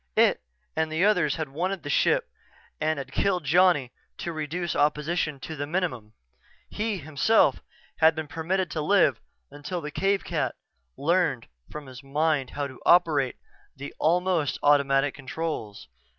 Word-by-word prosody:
It - - +4 0.3
and 160 0 0
the 160 +5 +2
others 180 -9 +3
had 155 -3 -4
wanted 180 +7 -3
the - - -6
ship - - +2 0.5
and 155 0 0
had 135 -1 -6
killed 185 +1 0
Johnny 160 -4 +3 0.3
to 170 - -4
reduce 160 +3 -3
opposition 150 0 0
to 160 - -6
the 145 0 -4
minimum. 145 - -3 0.6
He, 215 -1 -2
himself, 155 +8 +2 0.4
had 160 0 +5
been 160 0 -4
permitted 175 +4 -2
to 155 - -2
live 150 - +3 0.3
until 145 +5 -5
the 150 -2 -6
cave 195 +4 0
cat - - -2 0.4
learned 160 -6 +1 0.2
from 150 -1 -8
his 130 -2 -11
mind 145 0 0
how 145 - -3
to 130 -2 -10
operate 150 -7 +4 0.4
the 140 +1 -7
almost 175 -2 +1
automatic 140 -1 +3
controls. 135 - -5
155 Hz, 150 wpm, -26 LUFS, 140-175 Hz, 0.6 s, had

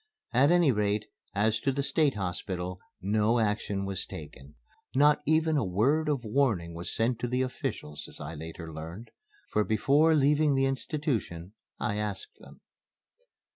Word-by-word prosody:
At 135 +4 +5
any 175 -4 +5
rate, 105 -1 0 0.3
as 110 +2 +2
to 135 - +1
the 140 +1 -1
State 145 -2 +2
Hospital, 90 -1 -3 0.2
no 105 +4 +2
action 105 -3 0
was 95 -1 0
taken. 70 +3 -10 0.4
Not 145 +2 +5
even 160 0 +3
a 140 - +2
word 135 - +2
of 140 -4 0
warning 105 -9 +1
was 85 +1 -5
sent 115 +1 0
to 120 - -1
the 125 +1 +1
officials, 75 - -5
as - - -9
I 75 +2 -6
later 80 +1 -8
learned; 85 +9 -8 0.4
for 105 - +2
before 145 +9 +3
leaving 145 0 +3
the 135 0 +3
institution 130 - -2 0.3
I 105 - -1
asked 105 -2 -4
them. - - -15
110 Hz, 155 wpm, -29 LUFS, 95-140 Hz, 0.4 s, At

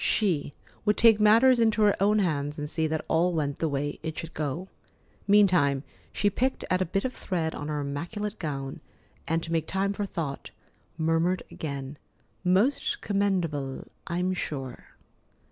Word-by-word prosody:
She 170 -9 +1 0.3
would 210 0 +2
take 225 -2 +6
matters 235 +4 +6
into 220 -1 +3
her 205 -1 +5
own 210 +2 +4
hands 150 -6 0
and 150 0 -3
see 160 +1 0
that 155 0 -2
all 175 +2 +2
went 145 -3 -1
the 160 - 0
way 145 +1 -2
it 160 -1 -5
should 165 0 -6
go. 155 +5 -3 0.6
Meantime, 180 -10 +4 0.3
she 205 - 0
picked 250 +6 0
at 185 0 +2
a - - +2
bit 195 +6 -1
of 255 - -2
thread 165 -4 -2
on 145 - -5
her 150 -1 -2
immaculate 175 +9 -4
gown, 135 -4 -4 0.5
and, 165 0 0
to 165 - -6
make 160 -1 0
time 195 +1 0
for 200 0 -3
thought, 155 -7 -4 0.5
murmured 165 +3 +1
again: 140 -2 -5 0.4
"Most 195 +10 +2
commendable, 175 -10 -1 0.2
I'm 180 +2 0
sure." 135 -7 -6
170 Hz, 160 wpm, -27 LUFS, 150-200 Hz, 0.6 s, take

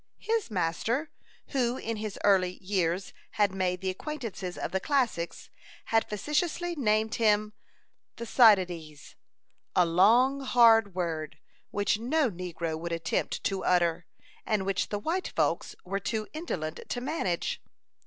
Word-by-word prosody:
His 450 - 0
master, 220 - -1 0.4
who 250 -2 0
in 230 -2 -4
his 210 -1 -5
early 185 -3 +4
years 185 -1 -1 0.2
had 205 -3 +2
made 180 -1 -1
the 190 -1 0
acquaintance 240 0 -6
of 180 -1 -4
the 190 - 0
classics, 235 - -1 0.4
had 225 - +3
facetiously 320 - -1
named 220 -5 +1
him 210 -1 +3 0.6
Thucydides 180 - +3 0.6
a 180 - +5
long, 230 +11 +4
hard 230 -6 +5
word, 160 -4 -3 0.3
which 205 +1 0
no 265 +2 +1
negro 170 -3 -4
would 170 +1 -5
attempt 165 -1 -2
to 195 -1 -1
utter, 175 -1 +2 0.4
and 210 -3 0
which 195 -1 -1
the 205 - -1
white 330 - -2
folks - - 0
were 195 +2 -2
too 215 +1 -3
indolent 170 - -4
to 245 - -2
manage. 245 - -2
205 Hz, 135 wpm, -29 LUFS, 180-240 Hz, 0.6 s, a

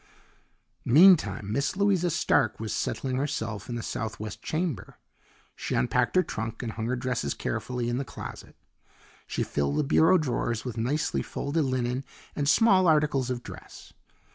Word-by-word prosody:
Meantime 155 - +5
Miss 140 +8 0
Louisa 190 -3 +2
Stark 165 -1 +1
was 110 -1 -3
settling 130 -1 -2
herself 115 -8 -3
in 120 - -3
the 120 - -4
southwest 110 -1 -5
chamber. 155 - -3 0.6
She - - -3
unpacked 60 - +1
her 185 - +5
trunk 115 -2 -5
and 115 - -3
hung 110 0 -4
her 125 - 0
dresses 125 - -2
carefully 125 -2 -3
in 120 +1 -1
the - - -1
closet. - - -9 0.7
She - - -2
filled 70 0 -1
the - - +2
bureau 160 +5 +5
drawers 120 -6 -2
with 125 -3 -4
nicely 130 +7 -1
folded 145 +2 -2
linen 130 0 -1 0.3
and 145 -1 0
small 190 -1 +5
articles 150 -5 +2
of 125 -1 -3
dress. - - -12
130 Hz, 155 wpm, -27 LUFS, 115-155 Hz, 0.7 s, Meantime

